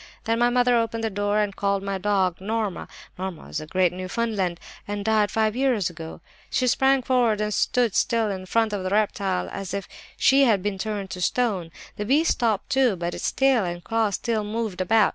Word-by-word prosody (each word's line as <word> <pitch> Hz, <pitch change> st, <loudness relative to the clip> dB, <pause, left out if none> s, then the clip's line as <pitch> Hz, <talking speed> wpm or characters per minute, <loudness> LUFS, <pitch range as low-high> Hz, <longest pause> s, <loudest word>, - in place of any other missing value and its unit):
"Then 230 Hz, 0 st, 0 dB
my 240 Hz, 0 st, +4 dB
mother 245 Hz, 0 st, +3 dB
opened 230 Hz, -1 st, 0 dB
the 225 Hz, -, -1 dB
door 205 Hz, +1 st, 0 dB
and 205 Hz, -2 st, 0 dB
called 200 Hz, -1 st, 0 dB
my 195 Hz, -1 st, -2 dB
dog, 190 Hz, -3 st, +1 dB
Norma. 215 Hz, -1 st, -2 dB, 0.3 s
Norma 185 Hz, -3 st, -5 dB
was -, -, -4 dB
a 155 Hz, -, -9 dB
great 180 Hz, +1 st, +2 dB
Newfoundland, 185 Hz, -1 st, -2 dB, 0.3 s
and 205 Hz, 0 st, -4 dB
died 215 Hz, -2 st, +3 dB
five 220 Hz, 0 st, +1 dB
years 245 Hz, -9 st, +1 dB
ago. 160 Hz, -1 st, -9 dB, 0.3 s
"She 255 Hz, -, +1 dB
sprang 265 Hz, +2 st, +3 dB
forward 240 Hz, -4 st, +2 dB
and 210 Hz, 0 st, -1 dB
stood 240 Hz, -1 st, +1 dB
still 225 Hz, 0 st, +1 dB
in 185 Hz, -1 st, -6 dB
front 225 Hz, +1 st, +1 dB
of 200 Hz, -, -2 dB
the 185 Hz, -, -1 dB
reptile 200 Hz, -2 st, 0 dB
as 195 Hz, -2 st, -5 dB
if 200 Hz, -2 st, -4 dB, 0.3 s
she 275 Hz, +1 st, +5 dB
had 210 Hz, -6 st, +2 dB
been 205 Hz, -2 st, -2 dB
turned 205 Hz, -2 st, -4 dB
to 180 Hz, -, -5 dB
stone. 195 Hz, -4 st, 0 dB, 0.3 s
The 210 Hz, -, -3 dB
beast 295 Hz, +8 st, +3 dB
stopped 225 Hz, +1 st, 0 dB
too, 260 Hz, -6 st, +3 dB
but 175 Hz, 0 st, -3 dB
its -, -, -2 dB
tail 265 Hz, -5 st, +3 dB
and 175 Hz, -1 st, -4 dB
claws 225 Hz, -3 st, 0 dB
still 225 Hz, -3 st, -1 dB
moved 210 Hz, -3 st, -3 dB
about. 215 Hz, +4 st, +4 dB
210 Hz, 205 wpm, -24 LUFS, 190-230 Hz, 0.3 s, she